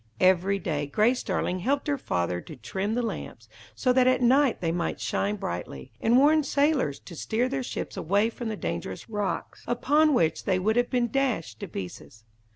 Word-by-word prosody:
Every 185 +2 +3
day 145 -6 -2
Grace 220 - +2
Darling 185 -1 -1
helped 275 +9 0
her 290 - +2
father 90 - -1
to - - -10
trim 190 - -3
the 245 - 0
lamps, 230 - -6 0.3
so 255 -2 +2
that 255 0 +4
at 255 - +4
night 255 +2 +4
they 165 -2 0
might 170 0 -2
shine 205 +1 -1
brightly, 85 - -6
and 235 +2 +4
warn 305 +3 +5
sailors 280 - +1
to 170 - -11
steer 230 +9 0
their 270 +1 -2
ships 250 - -5
away 205 +7 +1
from 235 -1 -5
the 215 - -4
dangerous 85 - -5
rocks, 210 -2 -3
upon 295 +5 +3
which 160 -7 +1
they 190 -2 +2
would 215 +4 +1
have 245 0 +2
been 240 -3 0
dashed 225 - -1
to - - -5
pieces. 100 +3 -8
215 Hz, 190 wpm, -27 LUFS, 165-255 Hz, 0.3 s, warn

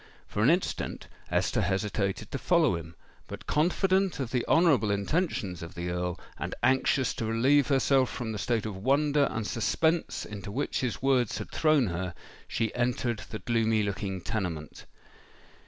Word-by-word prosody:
For 105 - -3
an 115 - +5
instant 175 +3 -1 0.2
Esther - - +1
hesitated 100 0 -1
to 135 - -3
follow 165 - +3
him; 85 0 -8 0.3
but, - - -8
confident 185 +4 +2
of 130 -4 -3
the 125 -2 +1
honourable 160 -10 +4
intentions 100 - -1
of 85 -1 -8
the 85 +1 -3
Earl, 90 0 -2 0.2
and - - -4
anxious 130 0 +2
to 115 - -3
relieve 130 +5 +3
herself 135 -1 +3
from 115 -2 -4
the 105 - -4
state 115 -1 0
of 105 -3 -4
wonder 140 +7 +2
and 110 -1 -3
suspense 160 +10 0
into 100 -1 -7
which 140 +7 -1
his 125 0 -3
words 130 -4 +2
had 105 - -7
thrown 155 -5 +3
her, 90 -2 -3 0.3
she 115 -2 -1
entered 120 -2 0
the 110 - -4
gloomy 110 -2 +1
looking 100 -2 -3
tenement. 85 -7 -4
115 Hz, 160 wpm, -28 LUFS, 100-140 Hz, 0.3 s, an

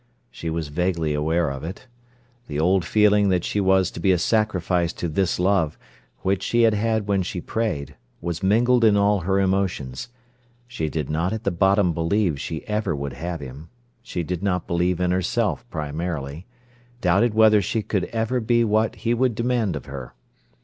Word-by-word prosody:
She 80 - -5
was 80 -2 -3
vaguely 85 -1 0
aware 80 +1 0
of 70 +1 -7
it. 90 +9 -7 0.6
The 75 0 -3
old 90 +3 +3
feeling 105 +2 +3
that 90 -2 +1
she 105 - -1
was 95 -1 +3
to - - -8
be 95 - +3
a 90 - +3
sacrifice 90 -4 +1
to 85 - -4
this 90 +3 0
love, 90 -4 +1 0.4
which 95 0 0
she 120 +4 +2
had 115 -1 +5
had 110 0 0
when 100 -1 +2
she 90 0 -4
prayed, 85 - -3 0.2
was 85 -1 -4
mingled 120 +5 +3
in 105 -2 +5
all 100 0 +3
her 95 +3 0
emotions. 95 - -1 0.6
She 80 -11 -3
did 75 -2 -3
not 85 +6 0
at 110 0 -4
the 100 - 0
bottom 95 +1 +3
believe 85 -2 0
she 80 +1 -5
ever 105 -6 -1
would 70 -2 -4
have 85 +5 -5
him. 70 +4 -9 0.3
She 90 -7 -4
did 90 +1 -4
not 90 -3 -1
believe 85 +1 0
in 90 -1 +1
herself 90 -1 -1
primarily: 75 0 -4 0.5
doubted 100 +3 +2
whether 110 -1 +6
she 110 +4 -1
could 100 -3 -1
ever 115 +2 -1
be 120 +1 +2
what 110 0 +1
he 115 - +3
would 120 -1 +1
demand 115 -6 0
of 70 - -6
her. 65 -3 -8
90 Hz, 185 wpm, -23 LUFS, 80-105 Hz, 0.6 s, whether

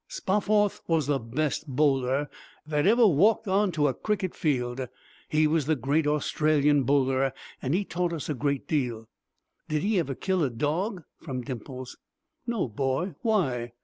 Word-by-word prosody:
"Spofforth 205 +1 +1
was 165 -3 +2
the 140 0 +1
best 145 +6 -2
bowler 135 0 +1 0.4
that 150 +2 +1
ever 235 +3 +6
walked 210 +5 +4
on 195 +1 +2
to 150 -2 +2
a 135 - +1
cricket 200 0 -2
field. 130 -5 -1 0.4
He 155 0 +3
was 155 -2 +1
the 155 - +3
great 145 +4 0
Australian 150 -1 +2
Bowler 135 -1 +2 0.3
and 130 +5 0
he 200 +2 0
taught 175 -1 -1
us 165 -4 -4
a 150 - -1
great 140 0 -2
deal." 120 -7 -1 0.6
"Did 150 -1 0
he 205 -1 +2
ever 140 -5 -2
kill 185 +2 0
a 140 - +1
dog?" 160 - -2 0.2
from 130 -5 -5
Dimples. 130 0 -7 0.5
"No, 235 - 0
boy. 135 - -1
Why?" 130 - 0
150 Hz, 160 wpm, -27 LUFS, 130-180 Hz, 0.6 s, ever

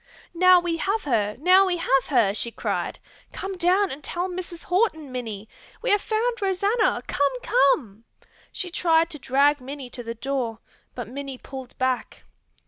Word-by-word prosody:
"Now 365 +1 +6
we 345 -1 -2
have 400 +6 -1
her, 210 -6 0
now 370 +5 +6
we 355 -1 0
have 270 -5 +2
her!" 235 -8 +3
she 215 +3 -2
cried. - - -3 0.3
"Come 385 0 -5
down 365 +3 +2
and 280 +2 -8
tell 350 +5 -2
Mrs. 360 -2 -6
Horton, 355 - 0
Minnie! 220 -5 -5 0.4
We - - +1
have 410 -1 +4
found 460 +2 -1
Rosanna! 400 +4 +1
Come, 275 -3 0
come!" 230 -6 +2 0.5
She 360 -2 -4
tried 330 -1 +2
to 300 - -4
drag 280 +2 +3
Minnie 265 -1 -7
to 245 - -6
the 230 0 -6
door, 245 -2 -2 0.4
but 245 -3 -5
Minnie 270 +2 -6
pulled 265 -1 -10
back. 255 -1 -2
290 Hz, 165 wpm, -24 LUFS, 255-365 Hz, 0.5 s, Now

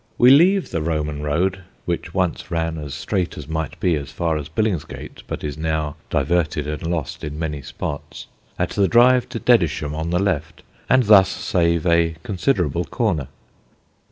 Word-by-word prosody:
We 125 +1 +7
leave 180 +7 +5
the 80 - -1
Roman 75 -2 -2
road 85 +6 0 0.3
(which - - -3
once - - -1
ran 80 -1 -2
as 75 -3 -6
straight 95 -4 -2
as 75 - -8
might 80 0 -4
be 90 - +2
as 70 -3 -3
far 80 +4 -1
as 75 -2 -4
Billingsgate, 95 -2 -3
but - - -5
is 75 0 -4
now 80 -2 -1
diverted 80 -3 0
and 75 0 -4
lost 85 -5 -3
in 75 -1 -5
many 75 -3 -3
spots) 75 +1 -6 0.3
at - - -1
the 100 -1 +2
drive 125 +2 +5
to - - -4
Dedisham, 80 -10 +2
on 80 +2 -3
the 90 - +1
left, 85 -4 -2 0.3
and 130 0 +5
thus 100 -3 +7
save 85 -3 0
a 85 -1 +3
considerable 90 - 0
corner. 90 - -1
80 Hz, 170 wpm, -21 LUFS, 75-95 Hz, 0.3 s, We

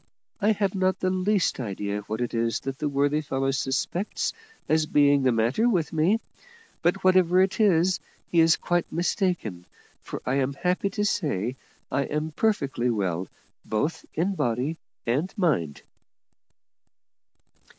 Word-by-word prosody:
I 215 +1 +3
have 200 -2 0
not 185 -1 +1
the 185 - +1
least 185 -1 +1
idea 105 -2 -3
what 110 +3 -3
it 120 - -2
is 115 0 0
that 135 0 -5
the 150 - 0
worthy 145 +2 +1
fellow 135 -2 -1
suspects 135 +8 -1 0.3
as 155 0 +2
being 145 -1 +4
the 130 -1 +3
matter 120 - +2
with 175 -9 0
me; 170 +8 +3 0.6
but, 175 +3 +1
whatever 185 -1 +5
it 190 +3 +2
is, 185 -3 +3 0.3
he 170 - +3
is 165 0 +6
quite 175 -1 -1
mistaken, 170 - -1 0.3
for - - -6
I 130 +2 +1
am 135 0 0
happy 180 +5 0
to 205 +2 -1
say 130 - -1 0.4
I 140 - +1
am 150 +1 -2
perfectly 145 - 0
well 95 -5 -1 0.4
both 130 +10 -2
in 180 +5 +1
body 130 +1 -1 0.3
and 140 +11 0
mind." 125 - 0
155 Hz, 145 wpm, -26 LUFS, 125-185 Hz, 0.6 s, is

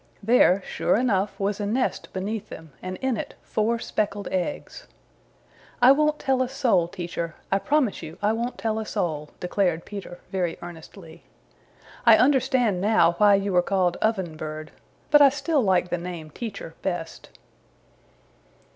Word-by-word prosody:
There, 200 -4 +4
sure - - 0
enough, 210 -5 0
was 200 +1 -1
a 205 - -2
nest 250 +5 -1
beneath 200 +3 -4
them, 160 -1 -10
and 185 0 -5
in 260 -3 +1
it - - -6
four 225 +2 0
speckled 205 -3 -2
eggs. 290 - -4 0.9
"I 245 +2 +7
won't 300 +2 +3
tell 265 -3 0
a 255 - 0
soul, 245 -10 +2
Teacher. 170 -2 -5 0.2
I 195 - +3
promise 285 -3 +1
you 160 0 -9
I 210 +1 +1
won't 235 +2 -3
tell 220 -1 -1
a 220 - -4
soul," 155 -7 -2
declared 180 -2 0
Peter 195 -4 -8
very 180 -3 -1
earnestly. 170 0 -12 0.8
"I - - +7
understand 255 -7 +2
now 205 -5 +4
why 205 -1 +6
you 195 -1 -1
are 180 - +6
called 180 -1 0
Oven 190 -8 -1
Bird, 155 0 -6 0.4
but 295 0 +7
I 280 - +9
still 290 +2 0
like 185 -4 +2
the 175 - 0
name 170 -3 -7
Teacher 200 -5 -7
best." 175 -3 -4
200 Hz, 155 wpm, -25 LUFS, 175-235 Hz, 0.9 s, I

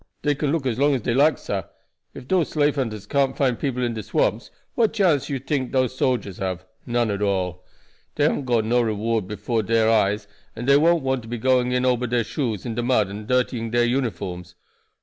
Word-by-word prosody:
"Dey 145 - +2
can 145 0 -1
look 160 -3 -1
as 125 -2 -1
long 145 0 +3
as 125 - -2
dey 120 - 0
like, 145 +5 +4
sah. 100 -1 -3 0.5
Ef 125 - -10
dose 180 -1 +1
slave 145 -1 +2
hunters 110 -7 -3
can't 135 +3 0
find 130 -4 +1
people 125 -3 -1
in 120 -1 0
de 110 - -4
swamps - - -1 0.2
what 225 -2 +2
chance 175 - +2
you 140 -2 -2
tink 135 -1 -2
dose 130 -1 +1
soldiers 120 -8 -1
have? 95 -1 -3 0.2
None 120 -2 +1
at 100 0 -3
all. 90 -3 -1 0.5
Dey - - +1
haven't 140 - +1
got 120 -3 +1
no 120 +2 +2
reward 110 -2 -1
before 105 +3 -2
dere 110 +1 +2
eyes, 105 -1 +1 0.3
and 115 +2 -5
dey 140 +1 +6
won't 165 +1 +3
want 130 -1 0
to 115 - -13
be 120 +1 -4
going 125 +1 +2
in 125 0 +1
ober 125 -1 +1
dere 120 0 +1
shoes 110 -5 -3
into 120 0 -2
de 120 - -3
mud 110 -6 +2
and 105 +2 -8
dirtying 125 -2 0
dere 120 +1 +2
uniforms. 100 -8 -2
120 Hz, 220 wpm, -23 LUFS, 110-135 Hz, 0.5 s, dey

